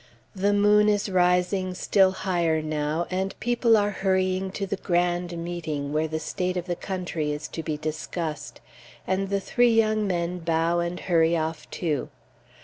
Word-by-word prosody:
The 200 Hz, +2 st, +2 dB
moon 210 Hz, +1 st, +4 dB
is 205 Hz, 0 st, +1 dB
rising 180 Hz, 0 st, +2 dB
still 190 Hz, +1 st, +4 dB
higher 175 Hz, -4 st, 0 dB
now, 155 Hz, +1 st, -1 dB
and 190 Hz, +1 st, -2 dB
people 240 Hz, -1 st, +3 dB
are 205 Hz, 0 st, +1 dB
hurrying 190 Hz, -1 st, 0 dB
to 200 Hz, -, -2 dB
the 200 Hz, 0 st, -3 dB
grand 175 Hz, -1 st, 0 dB
Meeting, 160 Hz, -4 st, -4 dB
where 155 Hz, +1 st, +1 dB
the 160 Hz, 0 st, -3 dB
state 180 Hz, +3 st, -2 dB
of 175 Hz, -, -3 dB
the 175 Hz, -1 st, -2 dB
country 175 Hz, -5 st, -3 dB
is 150 Hz, +1 st, -4 dB
to 165 Hz, -, -5 dB
be 155 Hz, -1 st, -3 dB
discussed, 155 Hz, +1 st, -5 dB, 0.4 s
and 190 Hz, +1 st, -1 dB
the 200 Hz, 0 st, +1 dB
three 240 Hz, +4 st, +2 dB
young 215 Hz, -1 st, +2 dB
men 175 Hz, -1 st, -1 dB
bow 165 Hz, +1 st, +1 dB
and 170 Hz, +1 st, -3 dB
hurry 165 Hz, -1 st, +3 dB
off, 160 Hz, 0 st, -3 dB
too. 155 Hz, -6 st, -2 dB
180 Hz, 165 wpm, -25 LUFS, 165-195 Hz, 0.4 s, moon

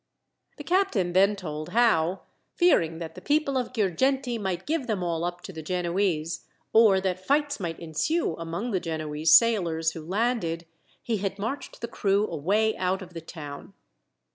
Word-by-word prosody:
The 295 Hz, -, -7 dB
captain 295 Hz, -, +1 dB
then 195 Hz, +3 st, +4 dB
told 155 Hz, -5 st, -6 dB
how, 190 Hz, -7 st, +2 dB, 0.3 s
fearing 165 Hz, -, +3 dB
that 160 Hz, -1 st, -6 dB
the -, -, -11 dB
people 295 Hz, -1 st, +1 dB
of 255 Hz, -2 st, -1 dB
Girgenti 240 Hz, +5 st, 0 dB
might 190 Hz, -3 st, -3 dB
give 310 Hz, -4 st, -1 dB
them 205 Hz, -5 st, -1 dB
all 170 Hz, -1 st, -1 dB
up 175 Hz, 0 st, -3 dB
to 190 Hz, -, -9 dB
the 160 Hz, -, -6 dB
Genoese, 175 Hz, -1 st, -1 dB, 0.3 s
or 220 Hz, -4 st, +6 dB
that 185 Hz, -1 st, -2 dB
fights 285 Hz, +4 st, +1 dB
might 170 Hz, -4 st, -4 dB
ensue 170 Hz, -, -1 dB
among 170 Hz, +8 st, -4 dB
the 190 Hz, -, +1 dB
Genoese 155 Hz, -1 st, -1 dB
sailors 170 Hz, -8 st, +1 dB
who 165 Hz, -, -8 dB
landed, 185 Hz, -3 st, -1 dB, 0.4 s
he 230 Hz, -2 st, -1 dB
had 195 Hz, 0 st, -3 dB
marched 225 Hz, +8 st, -5 dB
the 235 Hz, -, -3 dB
crew 200 Hz, -1 st, +1 dB
away 205 Hz, +7 st, +1 dB
out 185 Hz, +1 st, -1 dB
of 180 Hz, -1 st, -13 dB
the 165 Hz, -, -6 dB
town. 150 Hz, -3 st, -9 dB
185 Hz, 165 wpm, -26 LUFS, 165-230 Hz, 0.4 s, or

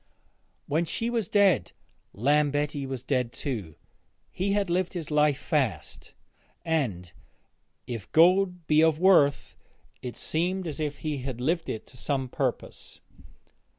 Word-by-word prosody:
When 160 Hz, +4 st, 0 dB
she 230 Hz, +7 st, -2 dB
was 230 Hz, -6 st, -1 dB
dead 195 Hz, -, +3 dB, 0.4 s
Lambetti 145 Hz, +3 st, +1 dB
was 130 Hz, -2 st, -5 dB
dead 125 Hz, -3 st, 0 dB
too. 110 Hz, -, -5 dB, 0.6 s
He 195 Hz, +2 st, -1 dB
had 205 Hz, -1 st, +1 dB
lived 180 Hz, +1 st, 0 dB
his 165 Hz, -4 st, -5 dB
life 150 Hz, -2 st, +3 dB
fast, 130 Hz, -, -2 dB, 0.5 s
and, 110 Hz, -, -1 dB, 0.7 s
if 115 Hz, -5 st, -7 dB
gold 180 Hz, +1 st, +4 dB
be 155 Hz, 0 st, +4 dB
of 160 Hz, -1 st, +3 dB
worth, 170 Hz, -7 st, +4 dB, 0.5 s
it 120 Hz, -2 st, -7 dB
seemed 180 Hz, +4 st, -1 dB
as 160 Hz, -2 st, -5 dB
if 150 Hz, -2 st, -2 dB
he 150 Hz, -2 st, -1 dB
had 130 Hz, -2 st, -5 dB
lived 165 Hz, +6 st, -1 dB
it 110 Hz, -, -4 dB
to 125 Hz, -, -17 dB
some 135 Hz, 0 st, -2 dB
purpose. -, -, -4 dB
150 Hz, 135 wpm, -27 LUFS, 130-175 Hz, 0.7 s, gold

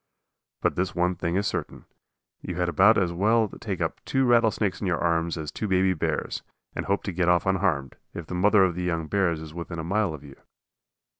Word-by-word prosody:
But -, -, +1 dB
this 95 Hz, +1 st, -2 dB
one 90 Hz, +1 st, +1 dB
thing 85 Hz, -1 st, -2 dB
is 100 Hz, +2 st, +1 dB
certain, -, -, -4 dB, 0.6 s
you 90 Hz, -, -5 dB
had 90 Hz, 0 st, 0 dB
about 95 Hz, +6 st, +5 dB
as 90 Hz, -3 st, +1 dB
well 110 Hz, +5 st, +3 dB
take -, -, -6 dB
up -, -, -3 dB
two 135 Hz, 0 st, +1 dB
rattlesnakes 115 Hz, -5 st, +2 dB
in 100 Hz, -, -1 dB
your 85 Hz, -2 st, +1 dB
arms 85 Hz, 0 st, 0 dB
as 75 Hz, -2 st, -5 dB
two 110 Hz, -, -4 dB
baby 95 Hz, -1 st, +3 dB
bears, 80 Hz, -, -2 dB, 0.3 s
and -, -, -4 dB
hope 100 Hz, +1 st, 0 dB
to 95 Hz, -, -3 dB
get 90 Hz, 0 st, +1 dB
off 90 Hz, -1 st, +3 dB
unharmed, 80 Hz, -8 st, 0 dB
if 85 Hz, -, -7 dB
the 90 Hz, -, -8 dB
mother 100 Hz, +2 st, +4 dB
of 90 Hz, -2 st, +2 dB
the 90 Hz, -, -4 dB
young 85 Hz, -2 st, -1 dB
bears 85 Hz, -2 st, 0 dB
is 80 Hz, -1 st, -10 dB
within 85 Hz, 0 st, -6 dB
a 80 Hz, -, -4 dB
mile 95 Hz, 0 st, 0 dB
of 75 Hz, -, -13 dB
you. 70 Hz, -2 st, -13 dB
90 Hz, 220 wpm, -26 LUFS, 85-100 Hz, 0.6 s, about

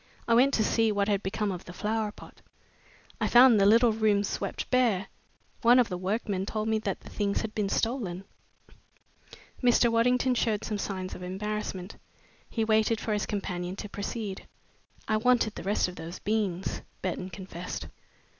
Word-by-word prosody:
I 230 Hz, -, +3 dB
went 255 Hz, +4 st, +5 dB
to 220 Hz, -, +2 dB
see 225 Hz, +1 st, +2 dB
what 200 Hz, -1 st, 0 dB
had 205 Hz, -2 st, +1 dB
become 200 Hz, +1 st, -2 dB
of 180 Hz, -2 st, -6 dB
the 175 Hz, -, -9 dB
flower 215 Hz, +2 st, -1 dB
pot. -, -, -15 dB, 0.8 s
I -, -, +1 dB
found 240 Hz, -3 st, +7 dB
the 195 Hz, -, +5 dB
little 230 Hz, +2 st, +6 dB
room 215 Hz, -2 st, +2 dB
swept 200 Hz, -1 st, -3 dB
bare. 230 Hz, -7 st, +2 dB, 0.5 s
One 240 Hz, +1 st, +6 dB
of 250 Hz, -2 st, +4 dB
the 180 Hz, -, -3 dB
workmen 195 Hz, 0 st, -2 dB
told 215 Hz, 0 st, -2 dB
me 220 Hz, 0 st, +2 dB
that 200 Hz, -3 st, -3 dB
the -, -, -12 dB
things 200 Hz, -1 st, -1 dB
had 220 Hz, -1 st, -5 dB
been 205 Hz, -2 st, -1 dB
stolen." 210 Hz, -7 st, -1 dB, 1.4 s
Mr. 245 Hz, -1 st, +4 dB
Waddington 250 Hz, +2 st, +3 dB
showed 225 Hz, -4 st, 0 dB
some 210 Hz, -2 st, -3 dB
signs 185 Hz, -2 st, -4 dB
of -, -, -8 dB
embarrassment. 190 Hz, 0 st, -4 dB, 0.5 s
He 225 Hz, -2 st, -1 dB
waited 220 Hz, 0 st, +2 dB
for 220 Hz, -, -2 dB
his 210 Hz, -, -1 dB
companion 180 Hz, -3 st, -3 dB
to 210 Hz, -, -7 dB
proceed. 200 Hz, 0 st, -5 dB, 0.6 s
"I 215 Hz, -, +2 dB
wanted 235 Hz, -1 st, +3 dB
the -, -, -7 dB
rest 200 Hz, 0 st, +1 dB
of 180 Hz, -, -9 dB
those 170 Hz, +2 st, -7 dB
beans," 200 Hz, -4 st, -2 dB, 0.2 s
Burton 185 Hz, 0 st, -3 dB
confessed. 180 Hz, 0 st, -7 dB
210 Hz, 175 wpm, -28 LUFS, 195-225 Hz, 1.4 s, found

